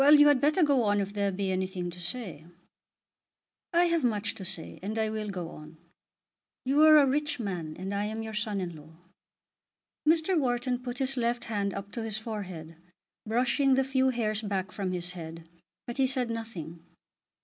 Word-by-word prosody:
You 295 +1 +8
had 285 -3 +4
better 305 +5 +4
go 285 -4 +4
on 205 0 +3
if 200 0 -2
there 200 -1 0
be 190 0 -1
anything 185 -1 -2
to 180 - -11
say." 175 -5 -4 1.3
"I 345 0 +4
have 335 -3 +2
much 220 -3 0
to 195 - -8
say, 180 -3 -5
and 210 +4 -4
I 220 -1 +1
will 215 -1 -3
go 180 -4 -4
on. 155 +1 -12 0.9
You 275 +3 +3
are 310 0 +9
a 290 - +7
rich 290 +1 0
man, 175 -8 -4
and 190 +2 -4
I 200 +1 0
am 220 +1 -3
your 220 0 -6
son 210 -1 -1
in 175 -3 -4
law." 155 +1 -14 1.1
Mr. 330 +3 +3
Wharton 245 -3 +1
put 250 0 -5
his 270 0 0
left 240 0 0
hand 200 -3 -2
up 200 +1 -6
to 235 - -4
his 220 -2 -1
forehead, 185 -8 -6 0.5
brushing 255 +4 +3
the 265 - +3
few 265 0 +2
hairs 220 -4 0
back 195 -3 -2
from 195 -3 -3
his 180 0 -2
head, 165 -2 -8 0.4
but 240 - -6
he 265 -1 +4
said 255 -3 0
nothing. 175 -8 -6
215 Hz, 190 wpm, -29 LUFS, 185-260 Hz, 1.3 s, are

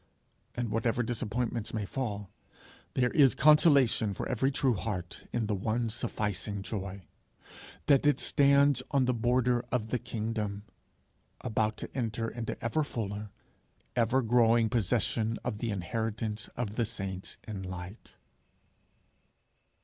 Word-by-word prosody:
And 120 -3 -2
whatever 115 +2 +1
disappointments 115 -1 -2
may 105 -2 -1
fall, 105 -4 -4 0.6
there 125 -1 +2
is 140 -5 +5
consolation 140 - +5
for - - -3
every 130 +2 +1
true 135 -2 +2
heart 95 -3 -5
in 120 -2 0
the 105 - -1
one 110 +4 -1
sufficing 105 -3 -2
joy 100 -2 -5 0.8
that 140 0 +4
it 145 - +3
stands 140 -1 +4
on 135 -2 +2
the 125 - +2
border 120 +1 +2
of 110 -3 -1
the 125 - 0
kingdom, 110 -3 -3 0.8
about 110 -2 0
to - - -8
enter 115 -3 -1
into 115 -1 -4
ever 155 +7 +1
fuller, 105 -6 -4 0.7
ever 125 +2 +2
growing 115 -1 +4
possession 115 +1 +1
of 105 - -3
the 115 - -2
inheritance 110 +2 -3
of 110 -3 -3
the 120 - +2
saints 95 -4 -5
in 105 -3 -5
light. 95 +2 -8
115 Hz, 130 wpm, -30 LUFS, 105-125 Hz, 0.8 s, is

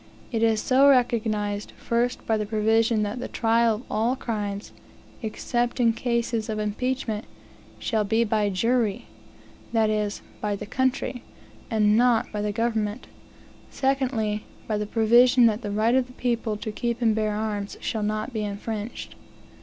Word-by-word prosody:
It 225 -2 -1
is 225 -1 +3
so 270 +5 +5
recognized, 215 -5 +1
first 240 +2 -1
by 225 - +2
the 210 -1 -1
provision 220 +1 +2
that 210 +4 -3
"the 250 - -4
trial 230 0 +2
of 220 - -9
all 230 +4 +1
crimes, 205 -5 -4 0.5
except 240 +2 -2
in 230 -2 +4
cases 235 -2 -1
of 215 - -2
impeachment, 220 +1 -2 0.5
shall 220 -3 0
be 220 +3 +2
by 215 -2 +1
jury" 220 +1 0 0.7
that 220 -2 +3
is, 210 -1 -2 0.2
by 210 -1 -1
the - - -6
country 260 +1 -1 0.5
and 210 -3 +3
not 240 0 +3
by 210 - -3
the 210 0 -1
government; 220 0 -1 0.6
secondly, 250 -6 0 0.2
by 215 - 0
the 210 - -3
provision 240 +3 +5
that 220 0 +2
"the 205 - -4
right 215 +3 +2
of 260 -1 +2
the 250 - -14
people 235 -4 -1
to 215 +1 -5
keep 235 +2 -2
and 230 -3 +3
bear 215 -1 0
arms 210 -2 -3
shall 220 - -2
not 215 +1 -2
be 215 -2 -2
infringed." 210 +2 -5
220 Hz, 160 wpm, -25 LUFS, 210-240 Hz, 0.7 s, so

